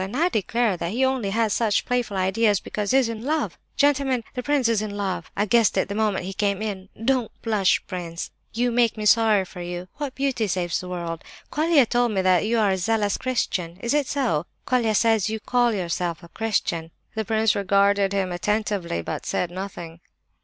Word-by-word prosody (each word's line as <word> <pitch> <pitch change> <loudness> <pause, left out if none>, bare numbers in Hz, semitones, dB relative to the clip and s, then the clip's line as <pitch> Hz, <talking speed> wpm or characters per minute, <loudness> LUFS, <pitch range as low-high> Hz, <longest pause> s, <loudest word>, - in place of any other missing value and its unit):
And 200 +7 -4
I 340 +4 +3
declare 220 - 0
that 170 +3 -3
he 260 +3 +2
only 260 -6 0
has 220 0 +1
such 220 -3 +1
playful 245 -5 -1
ideas 200 +2 +2
because 210 -1 -4
he's 265 -2 +4
in 225 -1 -5
love! 310 +4 -1 0.2
Gentlemen, 275 -4 +2
the 250 - -3
prince 285 -2 +1
is 230 -2 +2
in 205 -1 -4
love. 195 -2 -3
I 205 - +2
guessed 230 -1 +3
it 190 - +1
the - - -2
moment 210 -3 0
he 195 - -5
came 200 -1 0
in. 195 -3 -4 0.2
Don't 255 -3 +1
blush, 210 -5 +2
prince; 175 -3 -5 0.2
you 245 +2 0
make 235 -2 +2
me 215 - -3
sorry 210 -2 +4
for 180 0 -10
you. 175 +1 -6
What 290 -3 -4
beauty 265 -5 0
saves 175 -2 -1
the 180 - -7
world? 170 -2 -4 0.3
Colia 310 -3 +4
told 240 -1 +1
me 190 -2 +1
that 185 +2 +3
you 230 +1 +1
are 210 -3 +3
a 190 - +1
zealous 205 +1 +1
Christian; 180 -9 -2
is 235 +5 -1
it 295 -2 +1
so? 235 - 0 0.2
Colia 235 -4 +1
says 220 -2 +3
you 220 0 -3
call 245 +1 +2
yourself 175 -3 -2
a 170 - -12
Christian." 170 -6 -1 0.2
The 220 - -2
prince 220 0 +2
regarded 200 0 +2
him 195 -2 0
attentively, 195 - -1
but - - -5
said 175 - -1
nothing. 175 -3 -7
210 Hz, 205 wpm, -24 LUFS, 190-235 Hz, 0.3 s, he's